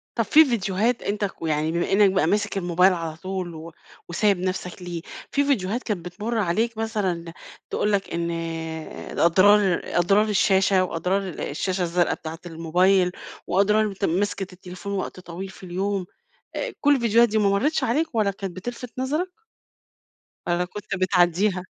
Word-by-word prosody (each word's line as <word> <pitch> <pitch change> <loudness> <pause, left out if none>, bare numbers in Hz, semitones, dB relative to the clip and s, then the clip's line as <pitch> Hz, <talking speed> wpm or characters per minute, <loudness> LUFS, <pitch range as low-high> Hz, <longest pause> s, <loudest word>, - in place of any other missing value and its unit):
طب - - +1
في 315 +1 +7
فيديوهات 225 -1 0
أنت 205 0 -1
كو 180 -4 -4
يعني 155 +1 0
بما 170 +3 -1
إنّك 200 -1 +5
بقى 185 -5 +2
ماسك 200 +2 0
الموبايل 180 +1 +3
على 165 -2 -4
طول 185 -1 -5
و 160 +1 -9 0.4
وسايب 195 +2 +2
نَفسك 185 0 -4
ليه، 175 -2 -5 0.3
في 285 - +2
فيديوهات 240 -4 0
كانت 200 -7 -3
بتمُر 210 +6 -3
عليك 220 +4 0
مثلًا 190 -7 -2 0.4
تقول 210 - 0
لك 195 -3 -1
إن 170 0 -1 0.9
أضرار 190 +2 +5
أضرار 195 +5 +3
الشاشة، 190 -2 +3
وأضرار 180 +3 -1
الشاشة 180 +3 -3
الزرقا 175 0 +1
بتاعة 160 0 -7
الموبايل 180 +3 +2 0.3
وأضرار 210 +3 +3
أنت 200 -1 -4
مسكِة 195 +2 0
التليفون 180 +2 -8
وقت 190 -1 -4
طويل 180 +2 -7
في 190 - -14
اليوم، 190 +1 -2 0.5
آآ، - - -3
كُلّ 290 0 +5
الفيديوهات 235 -2 +4
دي 220 0 +1
ما 205 -2 +3
مرّتش 275 +11 +1
عليك 300 +8 +1
لا 210 -3 +3
كانت 195 -2 -6
بتلفت 245 +4 -6
نظرك؟ 305 +8 -1 1.1
والّا 175 +1 +1
كنت 205 +3 -6
بتعدّيها؟ 185 +1 +2
190 Hz, 155 wpm, -24 LUFS, 175-210 Hz, 1.1 s, في